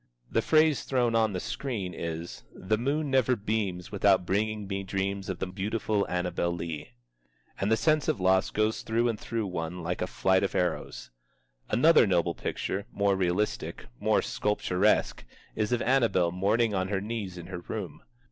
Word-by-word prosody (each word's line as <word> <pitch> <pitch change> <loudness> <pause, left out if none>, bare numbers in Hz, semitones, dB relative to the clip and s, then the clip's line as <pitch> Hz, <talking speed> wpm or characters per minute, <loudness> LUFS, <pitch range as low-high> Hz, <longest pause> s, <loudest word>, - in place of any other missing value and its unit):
The 115 - +2
phrase 155 +2 +3
thrown 125 -3 +1
on 110 -2 +2
the 90 - -2
screen 100 -6 -4
is 85 +1 -5
"The 110 +3 -1
moon 140 +3 -1
never 130 -1 +3
beams 100 -4 -2
without 100 -2 +3
bringing 105 +2 -1
me 100 0 -3
dreams 95 0 -3
of 95 - -2
the - - -2
beautiful 100 +2 -1
Annabel 90 -1 -1
Lee." 85 -5 -5 0.7
And 100 +3 0
the 110 - +4
sense 150 +7 +2
of - - +1
loss 95 +1 +3
goes 110 +1 0
through 115 +2 +1
and 110 -3 -3
through 115 -1 -3
one 90 -1 -4
like 90 +2 -3
a 90 - 0
flight 95 0 +2
of 100 - -1
arrows. - - -2 0.6
Another 125 +2 +5
noble 85 -2 +2
picture, 100 +4 -3
more 100 -1 +2
realistic, 95 +2 -1
more - - +2
sculpturesque, 105 -1 +1 0.3
is 110 +1 -1
of 120 - +1
Annabel 115 -9 +3
mourning 105 +5 +1
on 95 -1 0
her 100 0 -1
knees 100 -3 -4
in 85 - -8
her 90 0 -6
room. 90 -2 -6
100 Hz, 170 wpm, -28 LUFS, 90-110 Hz, 0.7 s, Another